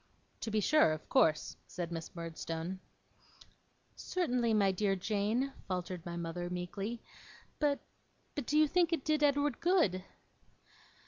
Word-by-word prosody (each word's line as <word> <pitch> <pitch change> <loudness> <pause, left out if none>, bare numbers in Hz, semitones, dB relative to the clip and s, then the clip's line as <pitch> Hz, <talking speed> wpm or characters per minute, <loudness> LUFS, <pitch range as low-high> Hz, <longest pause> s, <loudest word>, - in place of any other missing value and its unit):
'To - - -3
be 215 0 +1
sure; 210 - +5
of 155 - -7
course,' 165 - +3
said 175 -2 -5
Miss 165 0 -6
Murdstone. 165 +1 -4 1.2
'Certainly, 250 -11 0
my 200 -2 +4
dear 195 +1 +1
Jane,' 215 +7 0
faltered 180 -2 -3
my 170 0 -4
mother, 170 +1 -3
meekly. 195 +6 -4 0.6
'But 290 -2 +2 0.5
but 285 -5 -4
do 300 - +2
you 310 0 +6
think 345 +2 +3
it 325 -5 -1
did 305 -1 +2
Edward 290 0 +2
good? 330 - +3
205 Hz, 135 wpm, -33 LUFS, 175-285 Hz, 1.2 s, you